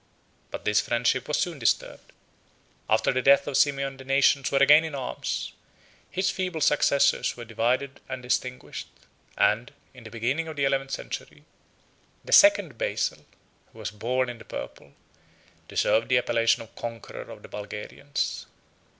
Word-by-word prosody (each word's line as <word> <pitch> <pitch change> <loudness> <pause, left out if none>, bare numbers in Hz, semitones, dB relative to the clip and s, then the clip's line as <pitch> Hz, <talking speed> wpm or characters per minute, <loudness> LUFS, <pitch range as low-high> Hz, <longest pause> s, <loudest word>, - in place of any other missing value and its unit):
But - - -7
this 105 0 +3
friendship 120 +2 0
was 150 - 0
soon 170 -5 -2
disturbed: 115 - -1 0.8
after - - +3
the 130 - +1
death 140 +2 +5
of 145 - -4
Simeon, 140 -1 +1
the 135 - -10
nations 135 -1 +3
were 140 - +2
again 145 +3 +7
in 160 -3 -5
arms; 130 -2 -4 0.6
his 190 +1 0
feeble 180 -3 -3
successors 140 -3 +2
were 120 - -7
divided 125 +5 -1
and 130 -1 -6
extinguished; 125 0 -3 0.5
and, 115 +3 +2 0.2
in 125 -2 -14
the 110 - -10
beginning 125 +9 -2
of 160 - -6
the 140 -1 +1
eleventh 135 0 0
century, - - -6 0.8
the - - -8
second 300 0 +6
Basil, - - -2 0.5
who - - -18
was - - -5
born 125 +5 -1
in 120 -1 -7
the - - -11
purple, 70 - -8 0.7
deserved 115 - +1
the 125 - +4
appellation 115 -2 +2
of 115 - -18
conqueror 115 -2 -7
of - - -11
the - - -10
Bulgarians. 105 +7 -5
130 Hz, 155 wpm, -26 LUFS, 120-140 Hz, 0.8 s, again